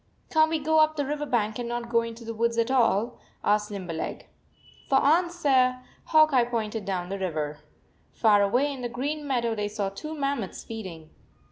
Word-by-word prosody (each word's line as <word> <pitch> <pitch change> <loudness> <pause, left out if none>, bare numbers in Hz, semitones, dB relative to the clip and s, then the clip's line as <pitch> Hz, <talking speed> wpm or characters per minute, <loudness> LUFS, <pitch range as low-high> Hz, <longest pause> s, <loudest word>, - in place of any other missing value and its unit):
11 - - -12
Can 315 -1 +5
t - - -6
we 295 - -9
go 315 0 +4
up 310 0 +4
the 290 -2 -1
river 295 +1 -3
bank 220 -3 0
and 240 -1 -3
not 240 0 -3
go 235 0 +2
into 230 0 -7
the 230 - -4
woods 230 +1 0
at 230 +2 +1
all?" 235 -2 +2 0.2
asked 210 0 +2
Limber 190 -5 -5
leg. 160 - -5 0.6
For 270 - +3
answer 285 -4 +3 0.3
Hawk 310 -2 +5
Eye 250 -2 +5
pointed 225 -3 -3
down 180 -2 -3
the 195 0 -4
river. 155 -5 -3 0.5
Far 210 -3 +4
away 250 +8 +2
in 265 - -8
the 240 - -3
green 290 +5 -3
meadow 235 -4 0
they 210 -1 -2
saw 205 -1 -2
two 305 +11 -7
mammoths 275 - -3
feeding. 185 -8 -8
235 Hz, 205 wpm, -26 LUFS, 210-280 Hz, 0.6 s, Can